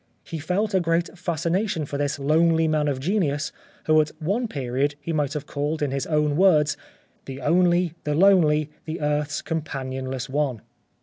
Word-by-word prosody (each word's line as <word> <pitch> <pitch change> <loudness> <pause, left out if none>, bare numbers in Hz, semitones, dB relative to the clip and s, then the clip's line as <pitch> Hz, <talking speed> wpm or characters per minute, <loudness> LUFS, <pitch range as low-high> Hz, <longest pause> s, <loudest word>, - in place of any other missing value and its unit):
He 165 - -6
felt 195 +7 -1
a 190 - +3
kind 165 0 +1
of 180 - -18
fascination 170 +1 -1
for 140 0 -5
this 145 -1 -1
lonely 160 +3 +3
man 155 -1 +1
of 140 -2 -1
genius, 145 -3 0 0.3
whom 155 0 +5
at 150 - -2
one 200 +10 -1
period 140 - -1
he 165 +3 -4
might 145 -3 0
have 150 -1 -4
called 150 +2 -2
in 140 - -1
his 135 0 -2
own 150 -2 +1
words, 155 -4 +4 0.2
" - - -37
• - - -40
The 135 0 -7
Only, 175 +2 +3
the 150 0 -1
Lonely, 155 -5 +4
the 160 +1 -4
Earth's 150 -1 -1
Companionless 130 -4 -4
One? 135 -5 -1
150 Hz, 185 wpm, -24 LUFS, 145-170 Hz, 0.3 s, whom